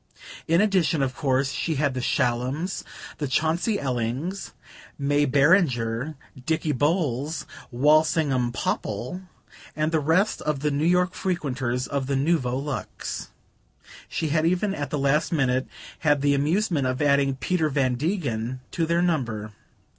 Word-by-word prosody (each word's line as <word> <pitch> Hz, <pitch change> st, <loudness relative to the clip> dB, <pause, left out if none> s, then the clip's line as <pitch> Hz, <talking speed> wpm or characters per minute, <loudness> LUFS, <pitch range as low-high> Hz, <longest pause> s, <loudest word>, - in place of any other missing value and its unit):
In 165 Hz, +3 st, +4 dB
addition, 185 Hz, -8 st, +2 dB
of 130 Hz, -1 st, -1 dB
course, 135 Hz, -3 st, +1 dB
she 160 Hz, -, -2 dB
had 145 Hz, -1 st, +1 dB
the 130 Hz, -, -3 dB
Shallums, 130 Hz, +10 st, -1 dB, 0.4 s
the 145 Hz, -, -1 dB
Chauncey 160 Hz, -, +1 dB
Ellings, 130 Hz, -, -3 dB, 0.5 s
May 145 Hz, +1 st, +2 dB
Beringer, 140 Hz, -, +2 dB, 0.3 s
Dicky 160 Hz, +1 st, 0 dB
Bowles, 145 Hz, 0 st, 0 dB, 0.2 s
Walsingham 145 Hz, -1 st, +3 dB
Popple, 120 Hz, -, -3 dB, 0.5 s
and 155 Hz, +1 st, 0 dB
the 160 Hz, -, +2 dB
rest 165 Hz, +8 st, +2 dB
of 150 Hz, -3 st, -2 dB
the 150 Hz, 0 st, +1 dB
New 145 Hz, +3 st, +1 dB
York 180 Hz, +1 st, +3 dB
frequenters 130 Hz, -8 st, -2 dB
of 140 Hz, -2 st, -2 dB
the 140 Hz, -, 0 dB
Nouveau 135 Hz, -3 st, +1 dB
Luxe; 145 Hz, +1 st, -5 dB, 0.8 s
she 160 Hz, -, -2 dB
had 155 Hz, +1 st, +2 dB
even, 180 Hz, +4 st, +1 dB
at 145 Hz, -6 st, -4 dB
the 150 Hz, -, -2 dB
last 145 Hz, +3 st, +1 dB
minute, 130 Hz, -5 st, +1 dB, 0.3 s
had 145 Hz, -3 st, +2 dB
the 145 Hz, 0 st, +3 dB
amusement 155 Hz, 0 st, +1 dB
of 130 Hz, 0 st, -1 dB
adding 140 Hz, -2 st, +3 dB
Peter 160 Hz, +3 st, 0 dB
Van 135 Hz, -3 st, +1 dB
Degen 130 Hz, -, -2 dB
to 165 Hz, -2 st, -1 dB
their 170 Hz, +1 st, +2 dB
number. 120 Hz, -11 st, -1 dB
145 Hz, 140 wpm, -25 LUFS, 130-165 Hz, 0.8 s, In